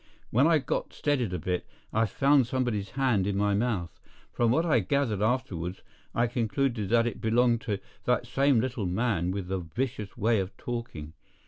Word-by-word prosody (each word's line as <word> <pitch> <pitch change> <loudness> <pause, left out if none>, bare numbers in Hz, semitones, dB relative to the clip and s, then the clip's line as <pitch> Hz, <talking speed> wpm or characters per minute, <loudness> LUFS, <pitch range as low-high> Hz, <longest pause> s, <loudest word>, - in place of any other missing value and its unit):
When 130 +7 +4
I 165 -1 +5
got 140 - -3
steadied 130 -9 0
a 90 - -1
bit, 90 +2 -2 0.3
I 110 +1 +2
found 135 +4 +3
somebody's 120 -6 -1
hand 120 -8 +2
in 100 -1 -1
my 100 0 +2
mouth. 100 -5 -1 0.3
From 120 -1 +2
what 160 +8 +2
I 145 -8 +4
gathered 110 -1 0
afterward, 95 -7 -1 0.3
I 120 - +3
concluded 115 -1 -1
that 115 0 +4
it 115 -2 -3
belonged 115 +1 +3
to 105 -3 -2 0.3
that 125 0 +1
same 135 0 +3
little 120 -4 -2
man 90 -2 0
with 95 -1 -3
the 95 0 -2
vicious 105 - -4
way 115 0 +2
of 95 0 -4
talking. 115 -11 -5
115 Hz, 180 wpm, -28 LUFS, 100-125 Hz, 0.3 s, I